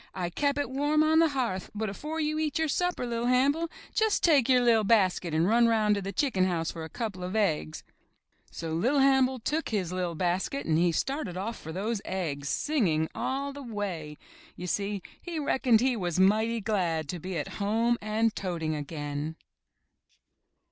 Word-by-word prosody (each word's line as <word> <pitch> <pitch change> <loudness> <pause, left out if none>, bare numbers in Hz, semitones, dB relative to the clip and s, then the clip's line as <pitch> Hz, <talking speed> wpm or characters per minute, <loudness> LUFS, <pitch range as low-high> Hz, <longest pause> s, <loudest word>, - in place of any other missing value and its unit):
I 175 -2 -3
kep' 285 +8 0
it 285 -2 -2
warm 295 +3 +2
on 315 +1 +4
the 330 - +6
hearth, 240 -10 -2
but 220 +1 -2
afore 300 +11 -5
you 305 0 0
eat 310 +1 -1
your 320 0 +1
supper, 355 -2 0
Li'T 235 0 -2
Hannibal, 285 +6 +2 0.2
jus' 440 -2 +2
take 285 -7 +4
your 255 -1 +5
li'r 230 -3 +4
basket 190 -5 +2
and 160 +3 +2
run 235 +2 +4
roun' 215 -2 +3
to 200 - -1
the 195 +1 -4
chicken 195 -3 +1
house 170 -3 -1
for 165 - -7
a 160 - -7
couple 210 -5 -5
of 185 +3 -4
eggs." 75 - 0 0.7
So 165 -1 -5
Li'r 245 - +2
Hannibal 265 -1 +4
took 300 +7 -2
his 190 -6 -1
liT 180 -3 -2
basket 185 - -1
and 160 0 +2
he 175 0 +3
started 240 - -2
off 220 +5 -3
for 160 - -8
those 200 +5 -2
eggs, 145 -7 -3
singing 175 - +1
all 275 +1 -2
the 285 - -8
way. 195 - -5 0.4
You 180 - -7
see, 200 +1 -2 0.2
he 345 -2 -5
reckoned 260 -6 +3
he 255 0 +2
was 180 -4 -2
mighty 220 +4 +3
glad 175 -7 0
to 180 - -4
be 185 +1 -4
at 150 - -5
home 230 +4 +1
and 215 +1 0
toting 170 -4 -2
again. 145 0 -4
215 Hz, 190 wpm, -28 LUFS, 175-265 Hz, 0.7 s, the